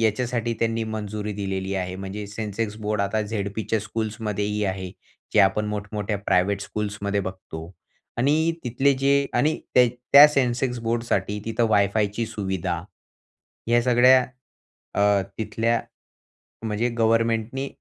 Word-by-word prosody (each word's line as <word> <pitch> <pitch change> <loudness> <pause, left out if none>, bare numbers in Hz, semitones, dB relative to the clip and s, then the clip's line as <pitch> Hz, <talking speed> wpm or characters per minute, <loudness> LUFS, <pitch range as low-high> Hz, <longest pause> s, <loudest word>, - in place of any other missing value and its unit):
याच्यासाठी 115 +1 0
त्यांनी 115 0 0
मंजुरी 105 -1 -4
दिलेली 95 -1 -3
आहे. 90 -1 -3
म्हणजे 95 +2 -6
सेन्सेक्स 105 +1 -4
बोर्ड 105 -1 0
आता 100 +2 0
झेडपीच्या 105 +1 -2
स्कूल्समध्येही 105 -1 -2
आहे. 95 -1 -3 0.4
जे - - +5
आपण 100 +2 +3
मोठमोठ्या 105 0 -3
प्रायव्हेट 100 +2 +2
स्कूल्समध्ये 100 -1 -2
बघतो. 95 -4 -7 0.5
आणि 155 +6 +2
तिथले 135 +3 +2
जे 140 +1 +2
आणि 155 +2 +2 0.2
त्या, 125 -1 +7 0.3
त्या 145 +1 +11
सेन्सेक्स 125 -3 0
बोर्डसाठी 115 -3 -1
तिथं 115 +1 +1
वायफायची 105 +2 +1
सुविधा, 95 -5 -3 0.9
या 120 0 +4
सगळ्या 125 +1 +5 0.7
अ, 100 -1 +4 0.2
तिथल्या 115 +1 0 0.9
म्हणजे 110 +3 0
गव्हर्नमेंटनी 115 +3 +1
110 Hz, 120 wpm, -24 LUFS, 100-115 Hz, 0.9 s, त्या